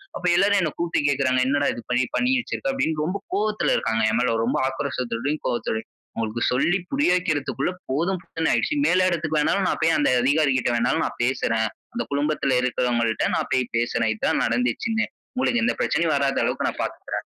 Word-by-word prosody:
அப்ப 180 - -6
எல்லாரும் 200 +2 +4
என்ன 170 - +1
கூப்பிட்டு 170 0 0
கேட்கிறாங்க 130 -2 +2
"என்னடா 145 +1 +1
இது 120 - -6
பண்ணி 125 +1 +2
பண்ணி 250 +1 +2
வச்சிருக்க?" 275 - -3
அப்படின்னு 160 - -1
ரொம்ப 185 +4 -2 0.2
கோவத்தில 210 -7 +1
இருக்காங்க. 110 0 0
என் 110 - +1
மேல, 125 -2 +1
ரொம்ப 125 - 0
ஆக்ரோசத்தோடயும், 135 0 -3
கோபத்தோடையும் 110 -2 -2 0.3
அவங்களுக்கு 115 +1 -3
சொல்லி 175 +9 +2
புரிய 275 -8 +2
வக்கிறதுக்குள்ள 155 -3 -1 0.2
போதும் 170 +8 0
போதும்னு 160 0 -1
ஆகிடுச்சு. 295 - +1
மேல் 185 +1 +3
இடத்திக்கு 155 -3 -1
வேனாலும் 190 +5 +1
நான் - - -1
போய், 165 0 +4
அந்த 145 - +2
அதிகாரிகள்ட 135 -3 +2
வேனாலும் 125 +7 +1
நான் - - -6
பேசுறேன். 115 -3 +1 0.3
அந்த 240 - -2
குழுமத்தில் 140 -2 +1
இருக்கிறவங்கள்ட 120 -2 0
நான் - - -2
போய் 130 -2 0
பேசுறேன். 115 -1 0
"இது 110 - -14
தான் - - +1
நடந்துச்சுன்னு, 125 - 0 0.3
உங்களுக்கு 245 -2 +1
எந்த - - +1
பிரச்சனையும் 160 -1 +1
வராத 140 -1 +1
அளவுக்கு - - 0
நான் - - -5
பார்த்துக்கிறேன்." - - -5
140 Hz, 180 wpm, -23 LUFS, 125-175 Hz, 0.3 s, எல்லாரும்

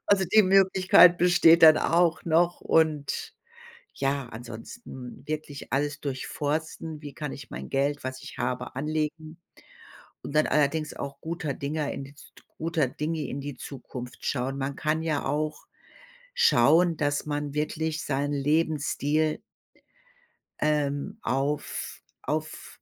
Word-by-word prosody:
Also, 195 -2 +3
die 215 +4 +5
Möglichkeit 185 -2 +6
besteht 170 -2 +6
dann 155 -1 +10
auch 170 0 +2
noch 170 +1 +2
und, 155 -3 +1 0.6
ja, 135 -2 -1
ansonsten 120 - -9
wirklich 150 -2 -6
alles 145 +1 -1
durchforsten, 150 +3 -3
wie 145 -2 -8
kann 150 -2 -5
ich 135 -3 -10
mein - - -7
Geld, 140 +1 0
was 130 0 -5
ich - - -10
habe, 125 0 -3
anlegen 155 +2 -3 0.9
und 145 - -7
dann 155 - +4
allerdings 150 +1 +1
auch 140 0 -6
guter 160 -3 -3
Dinge 145 +1 -3
in 135 - -6
die 140 +1 -15
Z - - -15 0.3
guter 160 -3 0
Dinge 150 +2 -3
in 140 +2 -5
die 145 -1 -6
Zukunft 125 -2 -8
schauen. 135 +1 -1
Man 135 0 -3
kann 155 +1 0
ja 155 -3 -1
auch 155 +1 -2 0.7
schauen, 175 - +4
dass 145 -1 -1
man 145 -1 -3
wirklich 155 +1 -2
seinen 145 +1 -1
Lebensstil 150 +1 0 1.2
ähm, 150 +6 0
auf 140 +3 -2 0.2
auf 155 +1 -4
150 Hz, 130 wpm, -27 LUFS, 140-160 Hz, 1.2 s, dann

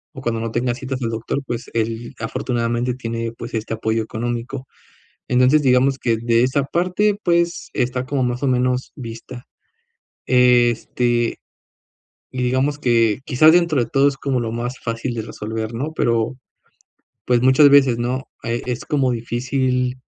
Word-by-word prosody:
o 135 - -7
cuando 120 -3 -1
no 115 0 -3
tenga 120 +1 0
citas 130 +1 -5
al 115 - 0
doctor, 115 +5 -3
pues 120 -1 -5
él 115 +2 -2
afortunadamente 120 0 -1
tiene, 115 -2 -4
pues 115 0 -9
este 110 0 -3
apoyo 110 0 -1
económico, 120 +4 -4 0.6
entonces 130 +4 +4
digamos 130 +1 +3
que 115 -3 0
de 115 0 +2
esa 135 +2 +1
parte, 180 +7 +1
pues 170 -1 0
está 125 +1 -1
como 135 0 -1
más 125 +2 -2
o - - +1
menos 125 0 0
vista, 120 -1 -9 0.8
este, 120 -1 +2 0.9
y 125 -1 -3
digamos 135 +4 0
que 115 -4 +2
quizás 155 +4 +5
dentro 170 -6 +3
de 115 - -8
todo 135 +3 +3
es 140 -1 -1
como 135 -3 -1
lo 115 -2 -3
más 120 +2 -4
fácil 115 +2 -3
de 115 - -3
resolver, 110 +1 -5
¿no?, 145 +7 -3
pero 115 -1 0 0.9
pues 120 -1 +2
muchas 130 +3 +6
veces 135 -4 +5
¿no?, 125 +2 -2 0.2
eh, 120 0 -2
es 125 +3 -3
como 135 -4 +1
difícil 125 +2 -1
125 Hz, 160 wpm, -20 LUFS, 115-130 Hz, 0.9 s, muchas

